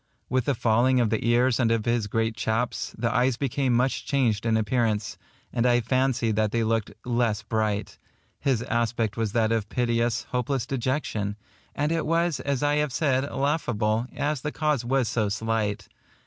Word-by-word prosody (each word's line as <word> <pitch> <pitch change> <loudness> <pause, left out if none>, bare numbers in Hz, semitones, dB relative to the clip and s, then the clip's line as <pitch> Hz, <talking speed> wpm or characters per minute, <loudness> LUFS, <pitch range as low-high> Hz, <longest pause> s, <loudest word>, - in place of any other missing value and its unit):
With 130 -1 +1
the 140 - +1
falling 120 +3 +3
of 115 -3 +2
the 110 - 0
ears 120 +1 +3
and 120 -3 +3
of 115 -2 0
his 120 -3 +1
great 115 +1 -1
chaps, 115 +3 -2
the 115 0 0
eyes 125 -1 +2
became 135 -1 0
much 125 +3 +1
changed 115 -6 0
in 110 -1 +3
appearance, 110 -1 0 0.4
and 120 - +1
I 120 0 +4
fancied 125 -2 +1
that 110 -1 +2
they 115 0 +1
looked 110 -2 0
less 120 -3 0
bright. 110 -2 -2 0.4
His 130 -4 0
aspect 115 -2 -1
was 110 -3 -2
that 115 -1 +2
of 110 -2 0
piteous, 120 -2 0
hopeless 125 0 -1
dejection; 130 -6 -2 0.4
and 150 +2 0
it 165 -2 0
was, 165 -1 +1
as 140 -1 -1
I 145 0 +2
have 150 -2 0
said, 135 -1 0
laughable, 120 -6 0
as 145 -2 -1
the 150 - -3
cause 150 -6 0
was 130 0 +1
so 110 -3 0
slight. 105 -1 -1
120 Hz, 175 wpm, -26 LUFS, 110-130 Hz, 0.4 s, I